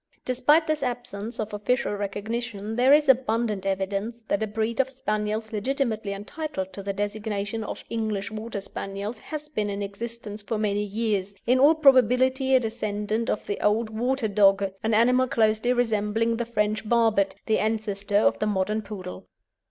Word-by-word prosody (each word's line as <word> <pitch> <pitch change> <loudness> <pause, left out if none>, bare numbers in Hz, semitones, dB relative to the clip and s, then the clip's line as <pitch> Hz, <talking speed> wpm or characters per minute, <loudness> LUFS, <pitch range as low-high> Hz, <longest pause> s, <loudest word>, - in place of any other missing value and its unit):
Despite 260 +6 +3
this 310 -1 -1
absence 240 -3 -4
of 215 -1 -3
official 210 +3 0
recognition 210 +2 -4
there 250 +3 +4
is 295 +1 +6
abundant 225 -6 +2
evidence 195 +4 -2
that 200 - +1
a 220 - 0
breed 220 +3 -2
of 265 0 +3
Spaniels 215 -3 -2
legitimately 220 -2 -1
entitled 200 -1 -5
to 200 - -6
the 200 0 -3
designation 205 +1 -3
of - - -6
English 215 -2 -2
Water 215 -1 -5
Spaniels 200 +3 -6
has 305 +3 -7
been 215 -9 -2
in 200 0 -3
existence 215 +1 -6
for 220 +2 -3
many 205 -1 0
years, 205 -2 -2
in 250 +2 +3
all 295 +4 +6
probability 260 -1 +4
a - - +6
descendant 215 -1 -2
of - - -1
the 205 - -3
old 215 +2 +1
"Water 245 +2 0
Dogge," 195 -1 +3
an 220 -1 +1
animal 250 +3 +4
closely 220 -2 +2
resembling 225 -1 +1
the 235 - -2
French 215 -2 -1
"Barbet," 215 -5 +3
the 220 - +2
ancestor 210 -2 0
of 115 - +3
the - - 0
modern 210 +1 0
Poodle. 195 -3 -8
220 Hz, 165 wpm, -26 LUFS, 205-240 Hz, -, is